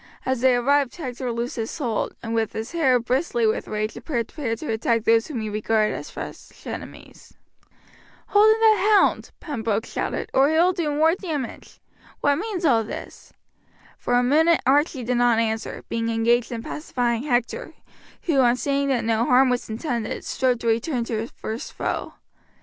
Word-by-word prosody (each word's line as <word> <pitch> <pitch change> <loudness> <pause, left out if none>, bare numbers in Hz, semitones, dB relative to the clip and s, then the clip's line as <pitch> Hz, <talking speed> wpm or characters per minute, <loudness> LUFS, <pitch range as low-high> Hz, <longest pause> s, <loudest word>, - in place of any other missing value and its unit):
As 260 -2 -1
they 260 -1 +5
arrived 275 +2 +2
Hector 255 -5 -4
loosed 235 +2 -4
his 225 +5 -4
hold, 240 -8 -2
and 225 0 -4
with 225 -1 0
his 220 +2 -5
hair 290 -7 +3
bristly 245 0 0
with 220 - 0
rage 215 +1 -2
prepared 240 -2 -3
to 305 - -4
attack 230 0 0
those 225 0 +3
whom 270 -8 -4
he 215 - -3
regarded 215 0 +1
as - - -6
fresh - - -9
enemies. - - -9 0.9
"Hold 420 +1 +6
in 440 - +2
that 430 -1 +5
hound," - - +1
Pembroke 225 -7 -2
shouted, - - -4
"or 270 +2 +4
he 315 - +1
will 350 +3 +4
do 340 -4 -1
more 310 +3 +3
damage. 315 - -5 0.4
What 285 0 +2
means 385 -2 -3
all 235 -6 +4
this?" 215 - -9 0.7
For 245 - 0
a 245 - +4
minute 320 +6 +4
Archie 280 0 +2
did 245 +1 0
not 240 -1 +3
answer, 220 -1 -2
being 230 0 -2
engaged 230 +1 +2
in 230 -1 -4
pacifying 245 -6 -2
Hector, 260 - -2 0.5
who, 315 -6 +1
on 245 -2 +4
seeing 280 +2 0
that 250 -4 0
no 225 0 +1
harm 255 +1 +4
was 245 -2 -2
intended, 235 0 -3
strove 255 -2 +1
to 235 - -3
return 235 +3 0
to 230 -1 -3
his 225 - -4
first 220 +2 -6
foe. - - -3
245 Hz, 180 wpm, -23 LUFS, 230-295 Hz, 0.9 s, Hold